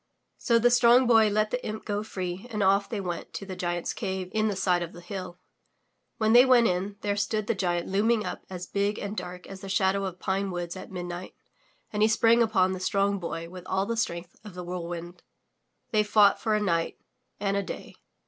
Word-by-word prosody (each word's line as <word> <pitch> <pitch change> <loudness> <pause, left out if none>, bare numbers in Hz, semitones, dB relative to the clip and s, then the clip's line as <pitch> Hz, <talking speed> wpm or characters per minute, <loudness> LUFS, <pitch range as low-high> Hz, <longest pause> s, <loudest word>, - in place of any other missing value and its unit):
So 235 - +3
the 240 +1 +4
Strong 245 +1 +6
Boy 225 -3 +5
let 215 +1 +1
the 250 - -2
imp 215 0 -5
go 205 -1 -1
free 185 0 -5
and 215 -3 -1
off 195 +1 +3
they 220 - -3
went 175 -3 -5
to 195 - -5
the 190 -1 -6
giant's 175 -1 -2
cave 190 -1 -4
in 220 0 +2
the 205 - -1
side 180 -2 +1
of 170 -1 -5
the 175 - -10
hill. 180 0 -7 0.8
When 220 0 +2
they 245 +1 +9
went 255 -3 +5
in, 190 +1 0
there 205 -1 0
stood 215 +1 -1
the 230 - +1
giant 175 -3 -1
looming 215 +3 +2
up - - -5
as 180 -1 -6
big 200 +3 -1
and 205 +1 -4
dark 180 -2 -6
as 195 -1 -10
the 195 - -7
shadow 190 +1 +1
of 185 -2 -5
pine 195 +1 -1
woods 175 -1 -4
at 185 - -9
midnight, 175 0 -6 0.6
and 210 - -1
he 215 - +6
sprang 225 +1 +4
upon 195 -5 +3
the 185 - -3
Strong 200 +2 +1
Boy 165 -1 -5
with 180 +1 -10
all 190 +1 0
the 230 +2 -2
strength 170 -6 -3
of 210 -4 -11
the 180 - -6
whirlwind. 175 0 -6 0.7
They 215 - +4
fought 210 -1 +4
for 215 -1 +1
a - - +2
night 170 -5 0 0.4
and 200 -1 0
a 200 - +1
day. 195 - -7
195 Hz, 220 wpm, -27 LUFS, 180-215 Hz, 0.8 s, they